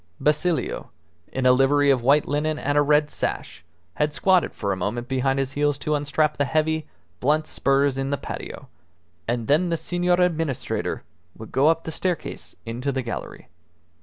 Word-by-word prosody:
Basilio, 155 +3 0 0.4
in 130 -1 -2
a 125 - +7
livery 140 +2 +4
of 130 -3 +2
white 145 +4 +4
linen 150 +2 0
and 145 0 -1
a 145 - +5
red 150 +1 +3
sash, - - -4 0.3
had 150 - 0
squatted 185 -2 +3
for 100 -2 -2
a - - -2
moment 110 +6 -3
behind 135 +1 0
his 135 -1 -1
heels 145 0 +1
to 150 +1 -2
unstrap 150 +1 +1
the 145 - +2
heavy, 155 +1 0 0.3
blunt 150 +4 +2
spurs 140 0 +1
in 135 0 -1
the 140 - 0
patio; - - -7 0.6
and 120 -1 -1
then 155 +7 +3
the 165 - 0
Senor 175 +2 +1
Administrator 165 -6 -1 0.3
would 110 - -10
go 135 +3 +3
up 165 0 +3
the 160 - -5
staircase 180 +1 -4
into 120 +5 -2
the 130 -1 -2
gallery. 120 - -6
145 Hz, 175 wpm, -24 LUFS, 135-155 Hz, 0.6 s, a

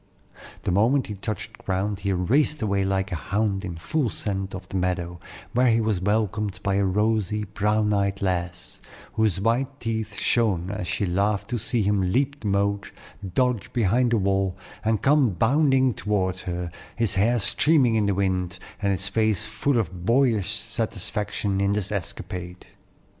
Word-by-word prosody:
The - - 0
moment 115 +9 +3
he 105 - -5
touched 105 0 -6
ground, 95 +1 -2
he 100 0 -1
raced 135 - +2
away 100 -2 +1
like 95 0 -1
a - - -1
hound 100 +3 -1
in 90 -3 -5
full 135 - 0
scent 95 -2 -3
to 95 -1 -6
the - - -8
meadow, 90 -1 -1 0.3
where 125 +2 +4
he 115 -1 +4
was 110 -5 0
welcomed 105 0 0
by 100 - +1
a 100 - +2
rosy, 105 +1 +1
brown 105 +1 +1
eyed 100 -1 0
lass, 90 -2 -3 0.3
whose 110 -4 +1
white 125 +6 0
teeth 110 -2 -3
shone 100 -6 +1
as 90 -3 -4
she 95 +3 -1
laughed 100 +5 0
to 120 - 0
see 115 +1 0
him 100 0 +2
leap 140 +4 +1
the 105 - -4
moat, 100 0 0 0.5
dodge 125 -4 +1
behind 120 +2 +2
the 115 - +3
wall, 95 -1 0 0.3
and 110 -2 +1
come 135 -6 +4
bounding 130 - +3
toward 95 -4 -1
her, 90 -1 -4 0.2
his 115 -4 +1
hair 110 +5 +3
streaming 130 +3 +3
in 110 -2 +2
the 100 - +1
wind, 90 -2 -1 0.2
and 100 -1 +2
his 95 0 -1
face 110 0 +1
full 115 +5 0
of 90 -5 -2
boyish 115 -3 +2
satisfaction 100 -1 -2
in 100 0 +2
this 105 -1 -2
escapade. 90 -2 -5
100 Hz, 170 wpm, -25 LUFS, 95-115 Hz, 0.5 s, where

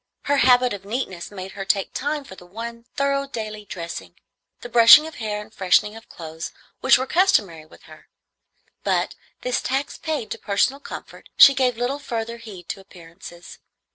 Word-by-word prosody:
Her 285 0 +1
habit 250 -2 +4
of 200 -1 -7
neatness 200 -5 -4
made 195 -2 -8
her 195 - -6
take 195 0 0
time 290 +2 -2
for 270 - -12
the 180 -1 -14
one 230 +4 -8
thorough 275 0 0
daily 215 -4 -6
dressing, 170 -3 -7 0.5
the - - -7
brushing 235 +5 +8
of 320 - -9
hair 215 -3 -3
and 215 +1 -11
freshening 210 +2 +2
of 225 - -13
clothes, 160 0 -7 0.3
which 265 - +5
were 260 - -2
customary 205 - +1
with - - -18
her; 155 -1 -16 0.8
but, - - 0 0.3
this 250 -1 -1
tax 270 +2 -2
paid 305 -8 -3
to - - -4
personal 235 +7 +1
comfort, - - -10
she 275 - +10
gave 255 -3 +1
little 250 +4 -2
further 235 -4 -4
heed 205 -7 -11
to - - -4
appearances. 175 -2 -13
225 Hz, 175 wpm, -23 LUFS, 195-260 Hz, 0.8 s, she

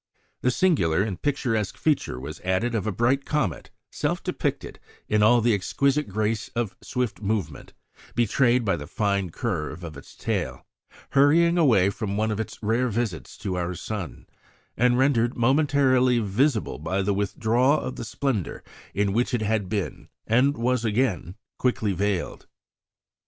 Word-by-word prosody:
The 125 - +2
singular 120 - +2
and 100 -4 -4
picturesque 120 -8 -1
feature 145 - 0
was 70 +4 -7
added 95 +6 0
of 110 -2 -1
a - - +1
bright 120 +7 +1
comet, 135 - -2 0.2
self - - -2
depicted - - -3 0.3
in 105 0 +2
all 120 +3 +5
the 115 0 +3
exquisite 140 +9 +1
grace 110 +2 -1
of 115 -4 -2
swift 125 -4 -3
movement 105 -1 -3 0.4
betrayed 120 +1 +2
by 100 -4 +1
the 75 -1 -8
fine 100 -1 0
curve 85 - -3
of 80 -3 -7
its 70 - -13
tail, - - -3 0.5
hurrying 160 +5 +5
away 110 - +4
from 100 -2 -3
one 110 +1 +1
of 105 - -2
its 110 -1 -4
rare 115 +4 +1
visits 115 -6 -3
to 95 -2 -1
our 90 0 -2
sun, 85 - -6 0.5
and 125 0 +3
rendered 125 -3 +2
momentarily 130 -1 +3
visible 115 - 0
by 95 +6 -1
the 100 +1 +1
withdrawal 110 +8 +2
of 130 - -5
the - - -6
splendour 115 - -2 0.3
in 100 -1 +1
which 120 +3 +1
it 115 - -1
had 105 -3 0
been, 105 -3 -3 0.2
and 130 +6 +3
was 125 +1 0
again 110 -5 0 0.2
quickly 110 -5 +1
veiled. 100 -1 -2
110 Hz, 155 wpm, -25 LUFS, 100-125 Hz, 0.5 s, all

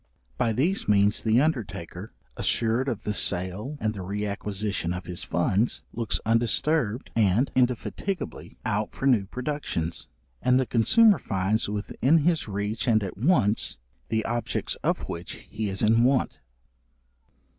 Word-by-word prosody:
By 115 - +1
these 160 - 0
means 105 0 +3
the 110 +1 +3
undertaker, 100 - -3 0.2
assured 115 +4 0
of 115 -5 -4
the 105 - -1
sale 100 +9 -1
and 110 0 -1
the 100 - -6
re 100 +3 -3
acquisition 100 -3 -2
of 90 0 -6
his 90 -1 -5
funds, 95 +7 0
looks 115 -2 -1
undisturbed 115 +2 +1
and 110 +4 +3
indefatigably 130 - -2
out 105 -1 -1
for - - -4
new 120 -7 +4
productions, 125 - -3 0.3
and 125 0 +4
the 130 - +1
consumer 205 - +4
finds 100 +2 0
within 110 +8 +1
his 160 -1 +1
reach 105 +3 -3
and 110 -3 +3
at 95 - -5
once, 115 - +2 0.3
the 110 0 0
objects 120 0 -2
of - - 0
which 85 +1 -6
he 105 -1 -5
is 95 +2 -2
in 115 +2 +4
want. 130 +1 +1
110 Hz, 145 wpm, -26 LUFS, 100-125 Hz, 0.3 s, new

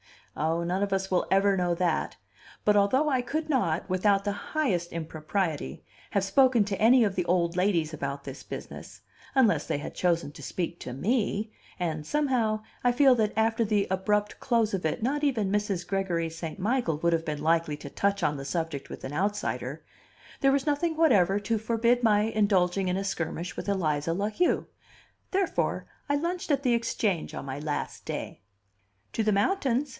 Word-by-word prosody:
Ah, 160 +4 0
none 180 +3 -1
of 200 -1 0
us 190 0 -1
will 180 - +1
ever 195 +1 +4
know 175 -1 +1
that! 170 -2 0 0.5
But, 210 - +4
although 260 +10 +3
I 260 -3 +2
could 310 +6 -3
not, 180 - +1
without 195 +2 +2
the 205 - 0
highest 200 - -1
impropriety, 160 - -3 0.3
have 200 - +1
spoken 245 +3 +4
to 200 -1 -3
any 240 +3 +6
of 200 -3 0
the 180 - 0
old 175 -1 +1
ladies 175 -5 +1
about 140 -1 -4
this 135 0 -8
business, - - -9 0.3
unless 215 - +3
they - - 0
had 145 - -6
chosen 170 -4 0
to 150 - -12
speak 175 -1 -4
to 125 - -6
me 215 - 0 0.3
and 160 -4 -3
somehow 245 -8 +1 0.2
I 245 -1 +3
feel 270 +1 +6
that 215 -3 +1
after 225 +1 +2
the 205 -1 +1
abrupt 205 +2 0
close 230 -4 +1
of 185 -4 -2
it 160 - -1
not 290 +4 0
even 225 -9 +1
Mrs. 205 -4 -1
Gregory 180 -4 -1
St. 165 +1 -6
Michael 205 - 0
would 170 +1 +2
have 165 0 0
been 150 -2 -3
likely 165 -2 +1
to 145 - -9
touch 200 +6 0
on 150 -1 +1
the 135 - -6
subject 160 -2 -3
with - - -9
an 135 - -5
outsider 200 +6 -2 0.6
there 270 0 +4
was 275 -1 +1
nothing 315 +2 0
whatever 205 - +4
to 225 +2 0
forbid 230 +2 +2
my 210 -2 +4
indulging 200 -4 +2
in 180 +1 0
a 195 - -2
skirmish 170 -3 -3
with - - -5
Eliza 165 -5 0
La 200 +4 -1
Heu; 345 +12 +1 0.7
therefore 385 -1 0 0.2
I 285 - +3
lunched 345 +4 -2
at 280 -2 +1
the 250 -3 +3
Exchange 215 -6 -1
on - - -6
my 135 +1 -5
last 150 0 -4
day. - - -5 0.7
"To 225 - 0
the 215 -1 +2
mountains?" 270 - +1
200 Hz, 185 wpm, -28 LUFS, 170-230 Hz, 0.7 s, any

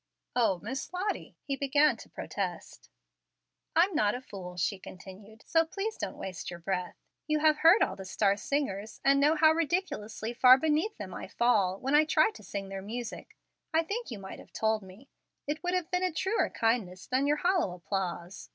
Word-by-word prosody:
"O 225 -6 +3
Miss 260 +5 -4
Lottie 370 +3 -3
" - - -57
he 275 - 0
began 285 +2 +3
to - - -13
protest. - - -5 0.9
"I'm 360 +4 +4
not 210 -7 +2
a 250 - -5
fool," 180 -7 -9
she 190 +2 0
continued, 200 +4 -12
"so 325 -1 +3
please 395 +7 -4
don't - - -5
waste 185 -3 -6
your 175 - -7
breath. 180 +1 -3 0.3
You 305 0 +2
have 305 0 +3
heard 340 +6 +7
all 190 - -1
the 195 - -8
star 200 +1 +2
singers, 215 -3 -3
and 275 0 +5
know 295 +3 +4
how 315 0 +6
ridiculously 315 - -2
far 255 +1 +8
beneath 315 +8 0
them - - -7
I - - -6
fall, 200 -6 +2
when 270 +2 -2
I 300 +1 +6
try 310 +5 +3
to - - -13
sing 195 0 -6
their 195 0 -5
music. 230 +4 -7 0.4
I 325 - +4
think 445 +8 -4
you 230 - -5
might 190 -1 -9
have - - -15
told 220 -1 +1
me. 195 +8 -14 0.4
It 295 +2 -3
would 355 +1 0
have 365 -1 -2
been 360 0 +1
truer 385 +6 +1
kindness 220 -6 -1
than 265 +2 +1
your 295 +1 +3
hollow 350 - +1
applause. 180 0 -4
250 Hz, 195 wpm, -30 LUFS, 195-315 Hz, 0.9 s, far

